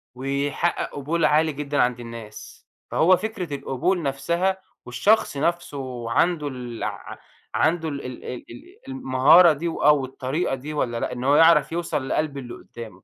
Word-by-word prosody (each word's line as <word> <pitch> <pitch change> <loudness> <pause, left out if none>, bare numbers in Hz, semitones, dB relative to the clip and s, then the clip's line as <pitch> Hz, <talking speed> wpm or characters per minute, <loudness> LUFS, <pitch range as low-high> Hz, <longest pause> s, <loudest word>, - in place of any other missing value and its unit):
ويحقق 140 +5 -1
قبول 155 +4 0
عالي 155 +1 +3
جدًا 145 0 -1
عند 125 -1 -1
الناس. 115 -2 -10 0.2
فهو 180 +2 +4
فكرة 185 -7 -5
القبول 140 +7 -1
نفسها 170 +7 0 0.3
والشخص 145 - +2
نفسه 140 -7 -3
عنده 160 +3 +1
الع 125 -4 -6 0.4
عنده 160 0 +1
ال 140 -2 -6
ال 125 -1 -8
ال 125 - -6
ال 120 - -14
المهارة 135 +6 +5
دي 165 +4 -4
وآه، 150 -2 +3
والطريقة 135 +3 -2
دي 145 +4 -7
والّا 120 -5 -1
لأ، - - -2
إن 125 0 -6
هو 140 +2 +4
يعرف 165 +1 +5
يوصل 165 -5 -2
لقلب 150 -2 -1
اللي 125 -3 -7
قدّامه. 115 -1 -10
145 Hz, 150 wpm, -23 LUFS, 130-165 Hz, 0.4 s, المهارة